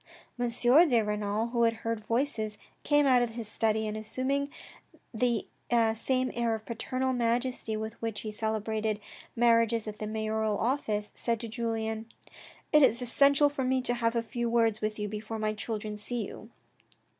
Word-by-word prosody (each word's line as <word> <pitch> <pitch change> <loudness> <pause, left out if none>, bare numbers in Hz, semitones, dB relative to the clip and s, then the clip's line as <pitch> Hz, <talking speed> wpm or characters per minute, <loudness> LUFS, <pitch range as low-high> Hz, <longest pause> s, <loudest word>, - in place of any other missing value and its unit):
M. 245 -1 +1
de 245 +3 +5
Renal, 210 +2 -1
who 235 0 0
had 230 -1 +3
heard 225 -1 -2
voices, 230 -4 -1 0.3
came 290 0 +4
out 255 -2 +5
of 235 -2 -1
his 230 -3 -5
study, 220 0 0
and 215 0 -3
assuming 260 +6 -1 0.6
the 235 -1 +1 0.5
same 255 +3 0
air 235 -1 0
of 220 0 -9
paternal 255 +3 -2
majesty 240 -1 0
with 220 +1 -6
which 225 -2 -3
he 215 - -5
celebrated 220 0 -1 0.4
marriages 230 -1 +3
at 210 0 -6
the 215 - -3
mayoral 220 -1 -1
office, 220 -4 -1
said 230 -2 -1
to 230 - -4
Julien: 225 -1 -3 0.3
" - - -21
It 300 - +7
is 240 -4 +5
essential 280 +4 +5
for 285 -2 -2
me 260 +1 +2
to 245 - 0
have 230 -1 0
a 230 - +1
few 235 +1 -2
words 225 -2 +2
with 215 0 -2
you 210 -1 -2
before 215 +2 -5
my 215 0 -1
children 215 0 -4
see 225 +1 -2
you." 215 - -10
230 Hz, 175 wpm, -29 LUFS, 215-245 Hz, 0.6 s, It